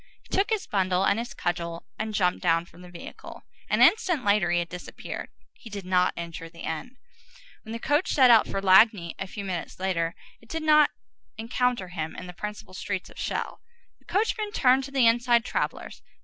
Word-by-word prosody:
He -, -, -4 dB
took 390 Hz, +1 st, +2 dB
his 440 Hz, -3 st, 0 dB
bundle 185 Hz, -1 st, +1 dB
and 200 Hz, -, +2 dB
his 235 Hz, +1 st, -6 dB
cudgel 170 Hz, -1 st, -3 dB
and 220 Hz, 0 st, -2 dB
jumped 180 Hz, -3 st, +1 dB
down 165 Hz, -1 st, +2 dB
from 175 Hz, -, -17 dB
the 180 Hz, -, -12 dB
vehicle. 175 Hz, -1 st, -10 dB, 0.3 s
An -, -, +4 dB
instant 360 Hz, -, +3 dB
later 200 Hz, -3 st, +3 dB
he 175 Hz, -, +2 dB
had 175 Hz, 0 st, 0 dB
disappeared. 180 Hz, +1 st, -7 dB, 0.2 s
He 230 Hz, -, -13 dB
did 200 Hz, -3 st, -7 dB
not 180 Hz, 0 st, +2 dB
enter 170 Hz, -1 st, -6 dB
the 165 Hz, 0 st, -14 dB
inn. 245 Hz, +11 st, -5 dB, 0.6 s
When 220 Hz, -, -10 dB
the 230 Hz, -, -3 dB
coach 295 Hz, +8 st, +1 dB
set 255 Hz, -3 st, +6 dB
out 225 Hz, -2 st, +6 dB
for 195 Hz, -, -3 dB
Lagny 190 Hz, -2 st, +5 dB
a 195 Hz, -, -4 dB
few 200 Hz, +1 st, -7 dB
minutes 180 Hz, -2 st, -5 dB
later, 175 Hz, -3 st, -1 dB, 0.3 s
it 230 Hz, -, -20 dB
did 320 Hz, -1 st, -3 dB
not 305 Hz, -1 st, +6 dB, 0.5 s
encounter 235 Hz, -3 st, -1 dB
him 160 Hz, -3 st, -5 dB
in 180 Hz, -, -7 dB
the 180 Hz, -, -9 dB
principal 210 Hz, +1 st, -7 dB
street 185 Hz, 0 st, -4 dB
of -, -, -17 dB
Chelles. -, -, -3 dB, 0.4 s
The -, -, -30 dB
coachman 425 Hz, +1 st, 0 dB
turned 260 Hz, 0 st, +4 dB
to 275 Hz, -, -10 dB
the 265 Hz, -3 st, +3 dB
inside 235 Hz, 0 st, +4 dB
travellers. -, -, -3 dB
200 Hz, 200 wpm, -26 LUFS, 180-250 Hz, 0.6 s, set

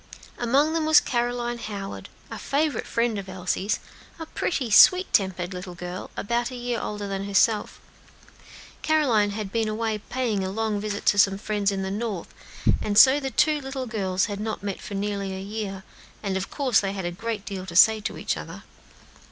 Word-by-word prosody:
Among 275 Hz, +6 st, +2 dB
them 320 Hz, -1 st, 0 dB
was 315 Hz, -1 st, +8 dB
Caroline 240 Hz, -1 st, -2 dB
Howard, 200 Hz, -3 st, -6 dB, 0.2 s
a -, -, -6 dB
favorite 295 Hz, +1 st, -1 dB
friend 230 Hz, -3 st, 0 dB
of 195 Hz, -1 st, -8 dB
Elsie's; 185 Hz, +2 st, -1 dB, 0.4 s
a 325 Hz, -, -6 dB
pretty, 270 Hz, -6 st, -2 dB
sweet 365 Hz, -, +7 dB
tempered 185 Hz, -2 st, +1 dB
little 180 Hz, 0 st, -7 dB
girl, 180 Hz, +1 st, -6 dB
about 235 Hz, +3 st, -1 dB
a 255 Hz, -, -8 dB
year 245 Hz, -1 st, -3 dB
older 210 Hz, -1 st, -4 dB
than 195 Hz, 0 st, -3 dB
herself. 205 Hz, +2 st, +1 dB, 1.0 s
Caroline 260 Hz, -10 st, +3 dB
had 205 Hz, -1 st, -5 dB
been 225 Hz, 0 st, 0 dB
away 215 Hz, 0 st, -2 dB
paying 225 Hz, -3 st, -2 dB
a 190 Hz, -, -2 dB
long 215 Hz, +1 st, -1 dB
visit 205 Hz, -1 st, -4 dB
to 205 Hz, -, +4 dB
some 195 Hz, -1 st, +4 dB
friends 205 Hz, -1 st, -1 dB
in 195 Hz, -1 st, -2 dB
the 190 Hz, -, -3 dB
North, 210 Hz, -4 st, -4 dB, 0.5 s
and 205 Hz, -1 st, -1 dB
so 265 Hz, +5 st, +8 dB
the 270 Hz, -2 st, -3 dB
two 300 Hz, +2 st, +2 dB
little 265 Hz, -1 st, -5 dB
girls 190 Hz, -5 st, 0 dB
had 205 Hz, -1 st, -5 dB
not 215 Hz, -1 st, -4 dB
met 200 Hz, -2 st, -4 dB
for 200 Hz, -, -7 dB
nearly 200 Hz, -1 st, -2 dB
a -, -, -5 dB
year, 195 Hz, -1 st, -5 dB, 0.4 s
and 195 Hz, -2 st, -1 dB
of 190 Hz, 0 st, -3 dB
course 260 Hz, -6 st, +2 dB
they 195 Hz, -1 st, -2 dB
had 190 Hz, -2 st, -4 dB
a 175 Hz, -, -2 dB
great 215 Hz, +3 st, -4 dB
deal 190 Hz, -2 st, -6 dB
to 170 Hz, -, -7 dB
say 220 Hz, +4 st, +7 dB
to -, -, -4 dB
each -, -, -1 dB
other. -, -, -8 dB
210 Hz, 195 wpm, -25 LUFS, 195-240 Hz, 1.0 s, was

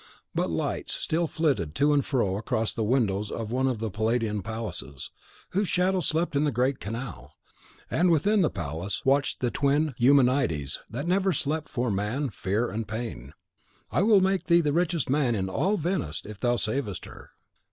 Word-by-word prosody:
But -, -, 0 dB
lights -, -, -2 dB
still 165 Hz, +1 st, 0 dB
flitted 130 Hz, -, 0 dB
to 150 Hz, +1 st, +3 dB
and 140 Hz, -1 st, +3 dB
fro 115 Hz, -9 st, 0 dB
across 110 Hz, +1 st, -1 dB
the -, -, -3 dB
windows 105 Hz, -3 st, +1 dB
of 110 Hz, -1 st, -4 dB
one 130 Hz, +2 st, +1 dB
of 130 Hz, -3 st, 0 dB
the 110 Hz, -1 st, -3 dB
Palladian 110 Hz, 0 st, 0 dB
palaces, 100 Hz, -, -4 dB, 0.4 s
whose 200 Hz, +2 st, +1 dB
shadow 185 Hz, +1 st, +2 dB
slept 165 Hz, -2 st, 0 dB
in 140 Hz, -, +3 dB
the 150 Hz, -, +2 dB
great 130 Hz, +3 st, 0 dB
canal; 115 Hz, +1 st, -7 dB, 0.6 s
and 180 Hz, +2 st, +3 dB
within 195 Hz, +6 st, +3 dB
the 165 Hz, -, +3 dB
palace 85 Hz, +3 st, -4 dB
watched 135 Hz, +1 st, +2 dB
the 120 Hz, -2 st, +1 dB
twin 145 Hz, +1 st, +1 dB
Eumenides 125 Hz, -, +3 dB
that 130 Hz, +6 st, -4 dB
never 190 Hz, +1 st, +2 dB
sleep 155 Hz, +2 st, -2 dB
for 120 Hz, -3 st, -1 dB
Man, 110 Hz, +8 st, -1 dB
Fear 105 Hz, +5 st, -1 dB
and 110 Hz, +1 st, -3 dB
Pain. 110 Hz, -, -6 dB, 0.6 s
"I -, -, +2 dB
will 205 Hz, -1 st, +5 dB
make 190 Hz, -1 st, +1 dB
thee 170 Hz, -1 st, +5 dB
the 150 Hz, -3 st, 0 dB
richest 170 Hz, -2 st, +1 dB
man 130 Hz, -3 st, +2 dB
in 95 Hz, -2 st, -2 dB
all 195 Hz, -, +1 dB
Venice, 165 Hz, -, -2 dB
if 105 Hz, -1 st, -9 dB
thou 120 Hz, -1 st, +2 dB
savest 110 Hz, -, -2 dB
her." -, -, -12 dB
125 Hz, 180 wpm, -27 LUFS, 105-155 Hz, 0.6 s, will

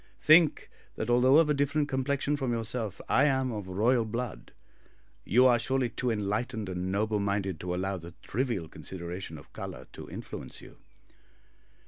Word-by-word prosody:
Think, 155 Hz, 0 st, +5 dB, 0.2 s
that -, -, -2 dB
although 130 Hz, +4 st, +6 dB
of 165 Hz, -1 st, +5 dB
a 150 Hz, -, +3 dB
different 145 Hz, +1 st, +1 dB
complexion 140 Hz, +1 st, 0 dB
from 135 Hz, -4 st, -2 dB
yourself, 115 Hz, -3 st, -3 dB
I -, -, +4 dB
am 130 Hz, -3 st, +1 dB
of 105 Hz, -4 st, -5 dB
royal 115 Hz, +6 st, +2 dB
blood. 115 Hz, +2 st, -5 dB, 0.7 s
You 125 Hz, +4 st, +5 dB
are 120 Hz, -2 st, +5 dB
surely 130 Hz, +1 st, 0 dB
too 125 Hz, +3 st, -2 dB
enlightened 110 Hz, 0 st, -2 dB
and 90 Hz, 0 st, -3 dB
noble 105 Hz, +2 st, 0 dB
minded 100 Hz, -4 st, -1 dB
to 90 Hz, 0 st, -3 dB
allow 95 Hz, +1 st, -2 dB
the 85 Hz, 0 st, -10 dB
trivial 115 Hz, -8 st, -2 dB
consideration 85 Hz, -1 st, -7 dB
of 70 Hz, -, -15 dB
colour -, -, -7 dB
to -, -, -9 dB
influence -, -, -8 dB
you." -, -, -14 dB
115 Hz, 160 wpm, -29 LUFS, 95-130 Hz, 0.7 s, although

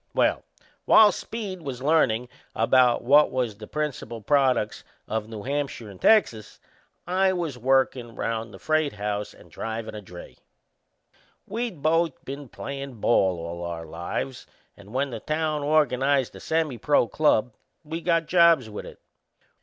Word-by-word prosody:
Well, -, -, +2 dB, 0.4 s
while 215 Hz, -2 st, +7 dB
Speed 205 Hz, -5 st, -6 dB
was 135 Hz, -4 st, -6 dB
learnin' 125 Hz, -6 st, +2 dB, 0.3 s
what 130 Hz, +3 st, +4 dB
was 125 Hz, -5 st, -1 dB
the 105 Hz, 0 st, -10 dB
principal 150 Hz, -6 st, -4 dB
products 130 Hz, -2 st, +1 dB, 0.2 s
o' 110 Hz, -, 0 dB
New 110 Hz, -1 st, -9 dB
Hampshire 140 Hz, -5 st, -3 dB
and 95 Hz, -, -15 dB
Texas 120 Hz, -, +2 dB, 0.5 s
I 190 Hz, +1 st, +2 dB
was 170 Hz, -7 st, -3 dB
workin' 125 Hz, -1 st, +1 dB
round 115 Hz, -1 st, -3 dB
the -, -, -11 dB
freight 155 Hz, -2 st, 0 dB
house 105 Hz, 0 st, -3 dB
and -, -, -18 dB
drivin' 110 Hz, 0 st, -5 dB
a 105 Hz, -, -7 dB
dray. 90 Hz, -3 st, -12 dB, 1.1 s
We'd 220 Hz, -7 st, -4 dB
both 165 Hz, -1 st, +1 dB
been 140 Hz, 0 st, -7 dB
playin' 135 Hz, -3 st, -7 dB
ball 95 Hz, -5 st, +2 dB
all 85 Hz, +1 st, -6 dB
our 85 Hz, -1 st, -5 dB
lives; 85 Hz, +11 st, -5 dB, 0.3 s
and 100 Hz, +1 st, -15 dB
when 135 Hz, +2 st, -1 dB
the 115 Hz, -, -5 dB
town 155 Hz, +2 st, -1 dB
organized 140 Hz, -3 st, +2 dB
a -, -, -9 dB
semi 160 Hz, -6 st, -1 dB
pro 145 Hz, -1 st, +3 dB
club 125 Hz, -2 st, +2 dB, 0.3 s
we 160 Hz, +2 st, -5 dB
got 165 Hz, -1 st, +1 dB
jobs 165 Hz, -9 st, +4 dB
with 105 Hz, -, -7 dB
it. -, -, -12 dB
135 Hz, 145 wpm, -25 LUFS, 110-155 Hz, 1.1 s, while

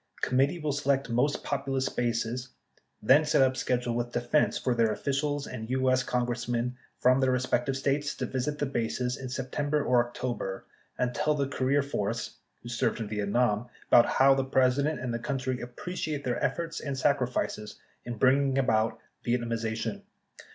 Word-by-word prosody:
— -, -, -22 dB
Committee 135 Hz, +6 st, +2 dB
will 155 Hz, -3 st, -2 dB
select 140 Hz, -2 st, 0 dB
most 130 Hz, +5 st, +1 dB
popu 140 Hz, -1 st, -3 dB
lous 135 Hz, -1 st, 0 dB
bases; 120 Hz, +1 st, -2 dB, 0.5 s
then 135 Hz, +7 st, +6 dB
set 150 Hz, -3 st, +4 dB
up 130 Hz, 0 st, +2 dB
schedule 125 Hz, -2 st, -1 dB
with 120 Hz, 0 st, -2 dB
Defense 120 Hz, +5 st, +2 dB
for 125 Hz, -, 0 dB
their 115 Hz, -2 st, +2 dB
officials 145 Hz, +4 st, -1 dB
and 115 Hz, -3 st, -7 dB
U.S. 130 Hz, 0 st, +2 dB
Congressmen 120 Hz, 0 st, -1 dB, 0.2 s
from 130 Hz, +1 st, +4 dB
the 130 Hz, -1 st, +3 dB
respective 130 Hz, +1 st, 0 dB
states 140 Hz, +1 st, 0 dB
to -, -, -3 dB
visit 135 Hz, +3 st, -2 dB
the 145 Hz, -, 0 dB
bases 125 Hz, -1 st, -1 dB
in 135 Hz, -2 st, -7 dB
Sept. 130 Hz, +1 st, -5 dB, 0.2 s
/Oct. 120 Hz, -7 st, 0 dB, 0.4 s
and 125 Hz, -1 st, 0 dB
tell 150 Hz, +2 st, +1 dB
the 140 Hz, -2 st, 0 dB
career 135 Hz, +1 st, +1 dB
force 115 Hz, -4 st, -3 dB, 0.3 s
(who 120 Hz, -, -8 dB
served 120 Hz, -1 st, 0 dB
in 110 Hz, -2 st, -4 dB
Vietnam) 105 Hz, +2 st, +1 dB, 0.2 s
about 120 Hz, -, +7 dB
how 135 Hz, +1 st, +5 dB
the 135 Hz, 0 st, +1 dB
President 135 Hz, +3 st, +2 dB
and 125 Hz, -2 st, -3 dB
the 115 Hz, -, -2 dB
country 130 Hz, -1 st, -2 dB
appre 125 Hz, +9 st, -7 dB
ciate 150 Hz, -5 st, -3 dB
their 125 Hz, -2 st, -2 dB
efforts 165 Hz, -1 st, -1 dB
and 140 Hz, -2 st, -4 dB
sacrifices 125 Hz, -6 st, -1 dB, 0.2 s
in 120 Hz, -1 st, -5 dB
bringing 135 Hz, +2 st, +3 dB
about 110 Hz, -4 st, +2 dB, 0.3 s
Vietnamiza 115 Hz, -2 st, -1 dB
tion. 110 Hz, -, -3 dB
130 Hz, 170 wpm, -28 LUFS, 120-140 Hz, 0.5 s, about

